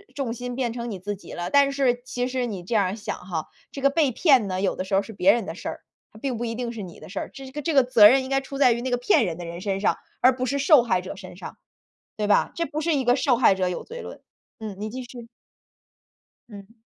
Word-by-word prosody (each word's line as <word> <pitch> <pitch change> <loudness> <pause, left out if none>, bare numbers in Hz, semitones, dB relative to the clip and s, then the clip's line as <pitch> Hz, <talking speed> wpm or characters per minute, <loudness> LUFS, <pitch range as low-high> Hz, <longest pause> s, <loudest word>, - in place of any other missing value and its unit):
重 265 -5 -2
心 245 +1 -6
变 240 -3 -1
成 235 -1 -5
你 195 - -5
自 205 +3 -4
己 195 - -13
了。 175 0 -4
但 280 -1 +4
是 255 -3 +1
其 250 -1 -2
实 255 -1 -2
你 195 -6 -6
这 190 - -5
样 200 -3 +4
儿 185 +3 -2
想 215 - -5
哈， 175 -4 -5 0.3
这 275 - -7
个 275 - +4
被 290 -2 +2
骗 260 - +4
呢， 185 -1 -2
有 195 - 0
的 - - -3
时 190 +1 -7
候 - - +5
儿 200 - -2
是 220 - -10
别 195 0 +4
人 230 -4 -1
的 165 - -6
事 - - -8
儿， - - -5 0.3
它 215 - -14
并 255 -1 -2
不 240 - -3
一 230 - -3
定 240 0 -3
是 225 -3 -7
你 175 -3 -9
的 - - -11
事 195 - -4
儿。 - - -5
这 270 - -9
是 260 - -10
个 295 - -5
这 320 +2 -1
个 270 - +6
责 230 -4 +7
任 265 +3 +4
应 260 - -7
该 270 - +2
出 270 0 -8
在 260 -4 +5
于 235 +1 -1
那 260 - -3
个 245 - +2
骗 245 -2 +3
人 170 -3 -3
的 175 - -7
人 170 +1 -7
身 195 0 -2
上， - - +2 0.2
而 255 +1 +6
不 255 - -1
是 280 +3 -1
受 290 -2 +6
害 185 -6 +1
者 185 +1 -8
身 185 -3 -10
上， - - -9 0.6
对 210 -1 -2
吧？ 205 - +3
这 335 - -1
不 310 -1 -4
是 320 -1 +1
一 270 - 0
个 245 0 +4
受 255 -2 +2
害 230 -5 +4
者 185 -1 0
有 180 - -3
罪 480 +1 -8
论。 - - -10 0.4
嗯， 215 -3 -6
你 215 - -4
继 255 +4 -6
续。 240 -1 -11 1.2
嗯。 205 0 -12
235 Hz, 320 characters per minute, -24 LUFS, 200-265 Hz, 1.2 s, 责